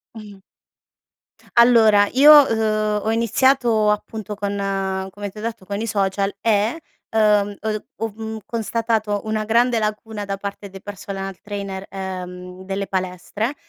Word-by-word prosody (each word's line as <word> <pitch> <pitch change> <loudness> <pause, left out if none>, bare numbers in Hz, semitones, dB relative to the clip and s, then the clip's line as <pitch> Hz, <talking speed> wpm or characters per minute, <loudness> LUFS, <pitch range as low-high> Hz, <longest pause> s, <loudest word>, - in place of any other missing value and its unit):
Mh-mh. 205 -3 -11 1.1
Allora 225 -4 +6
io, 285 +4 +8 0.2
uhm, 215 -1 0
ho 220 - 0
iniziato 230 -1 +2
appunto 210 0 -4
con 195 -2 -2
come 205 +1 -6
ti 195 - -17
ho - - -6
detto 225 -3 -5
con 200 +1 -4
i 225 - -3
social 200 -1 0
e, 220 +5 +1 0.3
uhm, 210 -2 +3
uhm, 215 0 -2
ho 225 - -1
v 210 - -20
mhmm, 220 0 -4
constatato 225 -2 -1
una 215 0 -2
grande 235 +2 +3
lacuna 215 0 -3
da 195 0 -3
parte 200 0 -7
dei 195 0 -11
personal 195 -1 -6
trainer, 200 -2 -5
ehm, 180 -1 -7
delle 195 +1 -3
palestre 190 +6 -3
210 Hz, 145 wpm, -21 LUFS, 195-220 Hz, 1.1 s, io